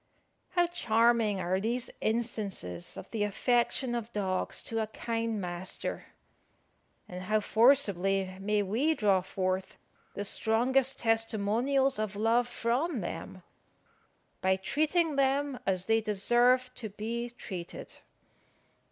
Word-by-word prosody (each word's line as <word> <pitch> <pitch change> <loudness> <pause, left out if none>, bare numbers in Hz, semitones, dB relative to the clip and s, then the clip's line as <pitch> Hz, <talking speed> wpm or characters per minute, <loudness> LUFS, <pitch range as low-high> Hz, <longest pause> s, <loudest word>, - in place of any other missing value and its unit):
How 350 -1 +3
charming 230 - +2
are 185 +1 0
these 235 +4 -2
instances 210 - -2
of - - -9
the 225 - -3
affection 240 +4 +1
of 235 -1 -4
dogs 190 -3 -2
to 225 - -2
a 215 - -2
kind 225 0 -3
master! 180 0 -4 1.0
and 180 0 -7
how 215 +3 +1
forcibly 195 -6 +3
may 205 +1 +1
we 250 +12 +1
draw 200 -7 +3
forth 185 0 -3 0.4
the 205 - -3
strongest 250 +6 +2
testimonials 225 +4 +1
of 215 -2 -2
love 230 +3 +2
from 245 +4 -1
them, 185 +1 -6 1.0
by 190 0 +3
treating 310 - 0
them 275 -1 +1
as 185 -1 +1
they 225 0 +3
deserve 240 +5 +2
to 225 -4 -4
be 230 +4 -4
treated! 185 -7 -8
225 Hz, 115 wpm, -30 LUFS, 195-245 Hz, 1.0 s, How